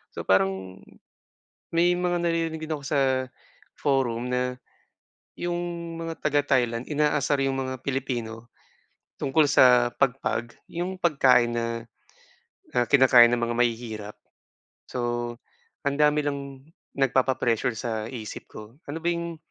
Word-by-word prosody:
So, -, -, -4 dB
parang 95 Hz, 0 st, +1 dB, 0.9 s
may 175 Hz, +1 st, +3 dB
mga 175 Hz, 0 st, 0 dB
naririnig 165 Hz, -1 st, -1 dB
din 155 Hz, -, -3 dB
ako 145 Hz, -, -5 dB
sa 130 Hz, -2 st, +1 dB, 0.5 s
forum 125 Hz, -4 st, 0 dB
na, 125 Hz, 0 st, -1 dB, 0.8 s
yung 175 Hz, 0 st, -2 dB, 0.4 s
mga 165 Hz, 0 st, -5 dB
taga 145 Hz, -1 st, +2 dB, 0.2 s
Thailand 120 Hz, +1 st, -2 dB
inaasar 150 Hz, -1 st, +1 dB
rin 135 Hz, 0 st, 0 dB
yung 135 Hz, -, -2 dB
mga 130 Hz, 0 st, -4 dB
Pilipino 120 Hz, -4 st, -3 dB, 0.7 s
tungkol 145 Hz, +2 st, +3 dB
sa 125 Hz, -3 st, +5 dB
pagpag 125 Hz, -3 st, -1 dB
yung 180 Hz, +2 st, -4 dB
pagkain 130 Hz, -8 st, +3 dB
na, 115 Hz, 0 st, -1 dB, 1.1 s
na 125 Hz, -, +3 dB
kinakain 125 Hz, -3 st, +7 dB
ng 120 Hz, -, +1 dB
mga 120 Hz, 0 st, -1 dB
mahihirap. 115 Hz, -3 st, -2 dB, 0.7 s
So, 125 Hz, -, -4 dB, 0.9 s
ang 140 Hz, 0 st, 0 dB
dami 150 Hz, 0 st, +3 dB
lang 140 Hz, -1 st, -1 dB, 0.6 s
nagpapa-pressure 125 Hz, -3 st, +1 dB
sa 110 Hz, -1 st, -3 dB
isip 110 Hz, -5 st, -8 dB
ko. -, -, -9 dB, 0.3 s
Ano 155 Hz, -, -3 dB
ba -, -, -1 dB
yung 170 Hz, -1 st, -5 dB
130 Hz, 125 wpm, -26 LUFS, 120-150 Hz, 1.1 s, kinakain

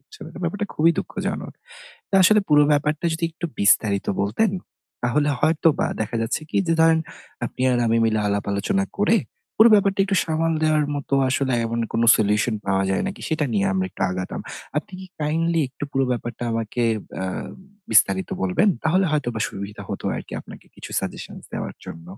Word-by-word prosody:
হচ্ছে 430 Hz, -, -17 dB
না, -, -, -9 dB
ব্যাপারটা 205 Hz, +5 st, -2 dB
খুবই 165 Hz, +2 st, +4 dB
দুঃখজনক। -, -, -4 dB, 0.6 s
তা -, -, -3 dB
আসলে 210 Hz, +3 st, +6 dB
পুরো 150 Hz, 0 st, +6 dB
ব্যাপারটা 150 Hz, +2 st, 0 dB
যদি 165 Hz, +1 st, -2 dB
একটু 170 Hz, +1 st, -5 dB
বিস্তারিত 100 Hz, 0 st, +3 dB
বলতেন, 110 Hz, -, +1 dB, 0.5 s
তাহলে 145 Hz, +5 st, +1 dB
হয়তোবা 160 Hz, 0 st, +2 dB
দেখা 110 Hz, +2 st, -2 dB
যাচ্ছে 115 Hz, +7 st, -1 dB
কি -, -, -2 dB
যে 165 Hz, -, +2 dB
ধরেন 165 Hz, 0 st, +5 dB, 0.5 s
আপনি 130 Hz, -, -4 dB
আর 120 Hz, -, +2 dB
আমি 115 Hz, 0 st, +2 dB
মিলে 110 Hz, -1 st, +2 dB
আলাপ-আলোচনা 100 Hz, -, 0 dB
করে, 215 Hz, +2 st, +4 dB, 0.4 s
পুরো 220 Hz, +2 st, +8 dB
ব্যাপারটা 200 Hz, -1 st, +3 dB
একটু 195 Hz, -1 st, 0 dB
সামাল 165 Hz, 0 st, 0 dB
দেওয়ার 155 Hz, -1 st, +2 dB
মতো 140 Hz, -1 st, -2 dB
আসলে 130 Hz, 0 st, 0 dB
এমন 115 Hz, +1 st, -2 dB
কোনো 115 Hz, +1 st, +2 dB
solution 105 Hz, +2 st, +1 dB
পাওয়া 95 Hz, 0 st, +2 dB
যায় 95 Hz, -, 0 dB
নাকি, 195 Hz, -, -5 dB
সেটা 160 Hz, -2 st, 0 dB
নিয়ে 100 Hz, -2 st, +1 dB
আমরা 95 Hz, -1 st, 0 dB
একটু -, -, -6 dB
আগাতাম। 90 Hz, 0 st, -4 dB, 0.4 s
আপনি 155 Hz, -, -3 dB
কি 190 Hz, -, -9 dB
kindly 165 Hz, +2 st, +1 dB
একটু 145 Hz, -, -7 dB
পুরো 135 Hz, 0 st, +2 dB
ব্যাপারটা 120 Hz, -1 st, -5 dB
আমাকে 115 Hz, +1 st, -2 dB, 0.3 s
অ্যা 95 Hz, -, -3 dB, 0.6 s
বিস্তারিত 95 Hz, -3 st, +4 dB
বলবেন? 95 Hz, -, +2 dB, 0.2 s
তাহলে 185 Hz, +4 st, +3 dB
হয়তোবা 120 Hz, -7 st, -1 dB
সুবিধা 100 Hz, +1 st, -7 dB
হতো -, -, -5 dB
আরকি -, -, -8 dB
আপনাকে -, -, -13 dB
কিছু -, -, -10 dB
suggestions -, -, -7 dB
দেওয়ার -, -, -4 dB
জন্য। 80 Hz, 0 st, -9 dB
145 Hz, 175 wpm, -23 LUFS, 110-165 Hz, 0.6 s, পুরো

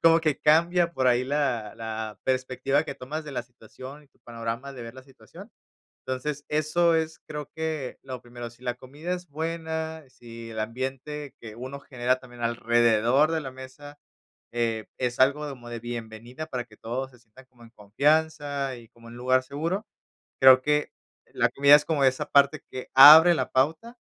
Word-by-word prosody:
como 165 Hz, 0 st, +6 dB
que 155 Hz, -3 st, 0 dB
cambia 170 Hz, +3 st, +3 dB
por 130 Hz, -5 st, 0 dB
ahí 125 Hz, 0 st, +3 dB
la 130 Hz, -7 st, -1 dB
la 110 Hz, -2 st, -6 dB
perspectiva 130 Hz, +3 st, 0 dB
que -, -, -6 dB
tomas 150 Hz, +5 st, -6 dB
de 145 Hz, -, -8 dB
la 125 Hz, -, -3 dB
situación, 125 Hz, +4 st, -13 dB
y 140 Hz, -, -29 dB
tu -, -, -36 dB
panorama 115 Hz, +3 st, -6 dB
de 125 Hz, -3 st, -9 dB
ver 115 Hz, 0 st, -9 dB
la 130 Hz, -, -12 dB
situación, 135 Hz, 0 st, -15 dB, 0.6 s
entonces, 140 Hz, +3 st, -3 dB
eso 155 Hz, +3 st, +2 dB
es 160 Hz, 0 st, -2 dB
creo 150 Hz, -2 st, -7 dB
que 160 Hz, -5 st, -4 dB
lo 130 Hz, -2 st, -7 dB
primero, 120 Hz, 0 st, -9 dB
si 120 Hz, +2 st, -20 dB
la 125 Hz, -1 st, -1 dB
comida 145 Hz, +8 st, -6 dB
es 180 Hz, 0 st, -7 dB
buena, 160 Hz, 0 st, -4 dB
si 115 Hz, -2 st, -11 dB
el 110 Hz, -, -6 dB
ambiente 135 Hz, +5 st, -5 dB
que 110 Hz, -2 st, -10 dB
uno 130 Hz, +4 st, -7 dB
genera 125 Hz, -2 st, -1 dB
también 120 Hz, -2 st, -14 dB
alrededor 120 Hz, +4 st, +2 dB
de 160 Hz, -, -1 dB
la 135 Hz, -3 st, -7 dB
mesa, 130 Hz, +3 st, -12 dB, 0.5 s
eh, 115 Hz, -2 st, -1 dB
es 125 Hz, -1 st, -2 dB
algo 140 Hz, +3 st, +3 dB
como 120 Hz, -3 st, -10 dB
de 120 Hz, -1 st, -6 dB
bienvenida 120 Hz, +4 st, -7 dB
para 125 Hz, -5 st, -4 dB
que 110 Hz, -3 st, -20 dB
todos 130 Hz, +4 st, -5 dB
se 125 Hz, -, -20 dB
sientan 120 Hz, +3 st, -19 dB
como 125 Hz, -2 st, -25 dB
en 115 Hz, -, -15 dB
confianza 145 Hz, +5 st, 0 dB
y 115 Hz, -1 st, -14 dB
como 115 Hz, 0 st, -17 dB
en -, -, -12 dB
un -, -, -10 dB
lugar 130 Hz, +1 st, +2 dB
seguro, 165 Hz, -, -3 dB, 0.6 s
creo 130 Hz, -1 st, +9 dB
que 150 Hz, +1 st, 0 dB, 0.4 s
la -, -, +2 dB
comida 140 Hz, +1 st, +7 dB
es 150 Hz, -, -2 dB
como 150 Hz, -4 st, +1 dB
esa 130 Hz, +3 st, +1 dB
parte 140 Hz, +2 st, +4 dB
que 130 Hz, -, -8 dB
abre 155 Hz, +6 st, +10 dB
la 130 Hz, -5 st, -2 dB
pauta 160 Hz, -, 0 dB
130 Hz, 185 wpm, -26 LUFS, 120-150 Hz, 0.6 s, abre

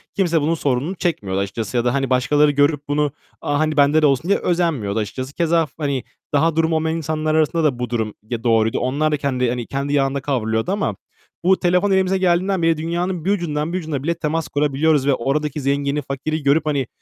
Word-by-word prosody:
kimse 170 Hz, -5 st, +2 dB
bunun 155 Hz, +3 st, +1 dB
sorununu 145 Hz, +4 st, -1 dB
çekmiyordu 100 Hz, -, -2 dB
açıkçası. 105 Hz, +4 st, -3 dB
Ya 120 Hz, -, +1 dB
da, 120 Hz, -, +2 dB
hani, 135 Hz, -1 st, 0 dB
başkaları 145 Hz, +4 st, +3 dB
görüp 145 Hz, 0 st, +1 dB
bunu 145 Hz, 0 st, 0 dB, 0.3 s
"A, 145 Hz, 0 st, -1 dB
hani, 155 Hz, -1 st, 0 dB
bende 145 Hz, +2 st, +4 dB
de -, -, +4 dB
olsun." 145 Hz, +5 st, +1 dB
diye 200 Hz, -, +3 dB
özenmiyordu 150 Hz, -, 0 dB
açıkçası. 130 Hz, +6 st, -5 dB
Keza 165 Hz, 0 st, +2 dB
f 145 Hz, -, -19 dB
hani, 140 Hz, -5 st, -2 dB, 0.3 s
daha 160 Hz, +2 st, +2 dB
durumu 165 Hz, 0 st, +2 dB
olmayan 160 Hz, +1 st, 0 dB
insanlar 155 Hz, 0 st, -1 dB
arasında 160 Hz, +1 st, +2 dB
da 135 Hz, -6 st, +1 dB
bu 125 Hz, -, -3 dB
durum 110 Hz, -3 st, -2 dB, 0.2 s
ya 115 Hz, -2 st, -4 dB
doğruydu. 115 Hz, -2 st, +2 dB
Onlar 145 Hz, +5 st, 0 dB
da 150 Hz, -, +1 dB
kendi, 130 Hz, -3 st, 0 dB
hani, 120 Hz, -1 st, -3 dB
kendi 140 Hz, +1 st, -3 dB
yağında 135 Hz, -1 st, +1 dB
kavruluyordu 115 Hz, 0 st, -1 dB
ama 205 Hz, +1 st, -1 dB, 0.5 s
bu 185 Hz, +2 st, +3 dB
telefon 180 Hz, +3 st, +2 dB
elimize 190 Hz, 0 st, +2 dB
geldiğinden 185 Hz, +1 st, +1 dB
bile 165 Hz, -1 st, +2 dB
dünyanın 170 Hz, +2 st, -2 dB
bir 195 Hz, -, +2 dB
ucundan 165 Hz, -4 st, -1 dB
bir -, -, 0 dB
ucuna 155 Hz, -5 st, -4 dB
bile 170 Hz, +3 st, +1 dB
temas 160 Hz, 0 st, -2 dB
kurabiliyoruz 145 Hz, 0 st, +1 dB
ve 140 Hz, -, +4 dB
oradaki 145 Hz, +4 st, -1 dB
zengini, 140 Hz, +1 st, 0 dB
fakiri 145 Hz, +3 st, -4 dB
görüp, 145 Hz, +3 st, +3 dB
hani, 140 Hz, -4 st, 0 dB
150 Hz, 210 wpm, -20 LUFS, 135-165 Hz, 0.5 s, bende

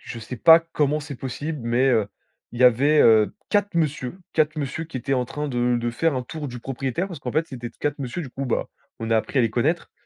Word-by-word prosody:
Je 120 Hz, -, -8 dB
sais 115 Hz, +3 st, -7 dB
pas 165 Hz, +3 st, +8 dB
comment 150 Hz, 0 st, +1 dB
c'est 145 Hz, -1 st, -7 dB
possible, 145 Hz, +4 st, -5 dB
mais, 120 Hz, +3 st, +2 dB
heu, 110 Hz, -4 st, +2 dB, 0.4 s
il 120 Hz, -, -8 dB
y -, -, +7 dB
avait, 140 Hz, +5 st, +5 dB
heu, 110 Hz, -2 st, +5 dB, 0.2 s
4 205 Hz, -2 st, +1 dB
monsieur, 155 Hz, -1 st, -1 dB
4 155 Hz, 0 st, +1 dB
monsieur 145 Hz, +1 st, -3 dB
qui 160 Hz, -4 st, -8 dB
étaient 130 Hz, +2 st, -1 dB
en 125 Hz, -1 st, +1 dB
train 150 Hz, +4 st, -4 dB
de 120 Hz, -1 st, +1 dB
de 120 Hz, 0 st, -1 dB
faire 155 Hz, +6 st, 0 dB
un 130 Hz, -, -2 dB
tour 150 Hz, +2 st, -6 dB
du 125 Hz, -, -7 dB
propriétaire. 135 Hz, +7 st, -3 dB
Parce 175 Hz, -7 st, -9 dB
qu'en 125 Hz, -, -4 dB
fait, 155 Hz, +5 st, 0 dB
c'était 120 Hz, -5 st, -7 dB
4 145 Hz, 0 st, -3 dB
monsieur 130 Hz, +6 st, -4 dB
du 140 Hz, -, -7 dB
coup, 135 Hz, +2 st, -4 dB
bah, 125 Hz, -, -1 dB, 0.3 s
on 115 Hz, 0 st, -4 dB
a 115 Hz, -, +4 dB
appris 110 Hz, +5 st, -1 dB
à -, -, +5 dB
les 115 Hz, -, +1 dB
connaître, 145 Hz, +10 st, 0 dB
135 Hz, 250 wpm, -23 LUFS, 120-155 Hz, 0.4 s, pas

